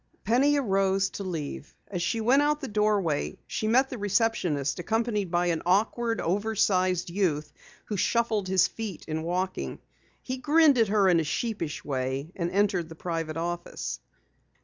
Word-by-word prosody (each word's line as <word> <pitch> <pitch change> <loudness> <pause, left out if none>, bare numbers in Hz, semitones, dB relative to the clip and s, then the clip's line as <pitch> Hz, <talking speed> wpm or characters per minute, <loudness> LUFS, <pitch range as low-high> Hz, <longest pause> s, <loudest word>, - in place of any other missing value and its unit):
Penny 270 +7 +3
arose 195 -5 +1
to 200 - -6
leave. 160 -5 -5
As 180 -3 -4
she 225 +6 0
went 255 +6 +4
out 295 0 +2
the 275 - -5
doorway 205 - 0
she 215 - -3
met 260 +4 +3
the 250 - -5
receptionist, 195 - 0
accompanied 215 0 -1
by 175 +1 +1
an 170 -2 0
awkward, 225 +5 +1
oversized 185 -2 +1
youth 165 -6 -1 0.3
who 210 - -3
shuffled 220 -1 +1
his 185 -1 +4
feet 220 -6 -7
in 160 0 -2
walking. 180 +3 -2 0.5
He 255 0 -4
grinned 290 0 +4
at 225 - +4
her 200 -1 +3
in 175 -2 +5
a - - +1
sheepish 170 -1 -3
way 135 +2 -2
and 170 -2 -2
entered 190 -3 +1
the 160 - -9
private 165 -2 -3
office. 175 +1 -4
195 Hz, 160 wpm, -27 LUFS, 170-225 Hz, 0.5 s, in